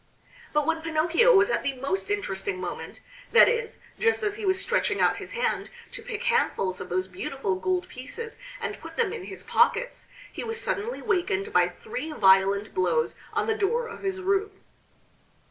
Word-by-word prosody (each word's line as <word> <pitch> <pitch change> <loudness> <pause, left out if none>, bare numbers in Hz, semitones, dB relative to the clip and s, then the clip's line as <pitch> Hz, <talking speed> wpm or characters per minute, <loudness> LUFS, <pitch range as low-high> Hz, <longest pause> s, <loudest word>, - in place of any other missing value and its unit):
But 300 -1 +2
when 320 +1 0
Pinocchio 335 +9 +4
was 395 +4 +5
at - - +1
the 280 - -1
most 325 +10 -3
interesting 405 -1 -2
moment, - - -6 0.3
that 475 - +9
is, 470 -1 -1 0.2
just 455 0 +2
as 415 -1 +1
he 420 -2 -4
was 380 0 +3
stretching 485 +5 0
out - - +3
his - - -7
hand 480 0 -1 0.2
to - - -8
pick 460 -1 -5
handfuls 465 - +1
of 180 - -7
those 185 +1 -1
beautiful 195 +3 -3
gold 360 - -1
pieces 440 - -7 0.2
and - - -4
put - - -10
them 450 -3 +1
in 425 -5 -6
his 390 - -9
pockets, - - +1 0.3
he - - -5
was 455 0 -2
suddenly 450 +4 -2
wakened 400 0 0
by - - +4
three 440 -8 -6
violent 195 -3 +4
blows 170 -3 +1 0.2
on - - +1
the 445 - +1
door 445 +3 0
of 460 - -9
his 385 -1 -2
room. 395 +2 +1
390 Hz, 180 wpm, -26 LUFS, 280-455 Hz, 0.3 s, that